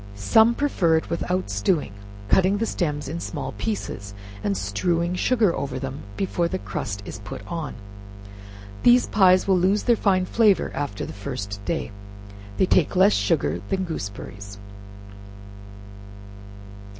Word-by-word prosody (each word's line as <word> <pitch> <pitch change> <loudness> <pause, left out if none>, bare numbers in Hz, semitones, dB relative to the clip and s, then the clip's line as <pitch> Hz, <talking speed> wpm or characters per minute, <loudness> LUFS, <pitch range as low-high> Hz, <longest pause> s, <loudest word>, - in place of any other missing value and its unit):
Some 220 - +4
prefer 185 - +2
it 160 - -4
without 180 - -1
stewing, 100 - 0 0.3
cutting 190 - +3
the 225 - 0
stems 150 -9 -2
in 165 +5 -4
small 145 -6 -5
pieces, 100 -1 -4 0.3
and 100 -2 0
strewing 165 - 0
sugar 215 -1 +2
over 135 -2 -3
them 135 +2 -5 0.2
before 175 -3 0
the 185 - -2
crust 100 - -5
is 105 - -7
put 100 -1 -8
on. 165 -4 -5 1.1
These 245 +1 +6
pies 185 -2 +4
will 190 -2 +4
lose 195 +4 +2
their 240 - +4
fine 190 -4 +2
flavor 210 -3 +3
after 120 -9 -3
the - - -8
first 100 0 -6
day. 160 -8 -2 0.7
They - - +4
take 180 -1 +2
less 195 +3 +5
sugar 85 -5 0
than 190 0 0
gooseberries. 100 - -7
165 Hz, 140 wpm, -24 LUFS, -, 1.1 s, These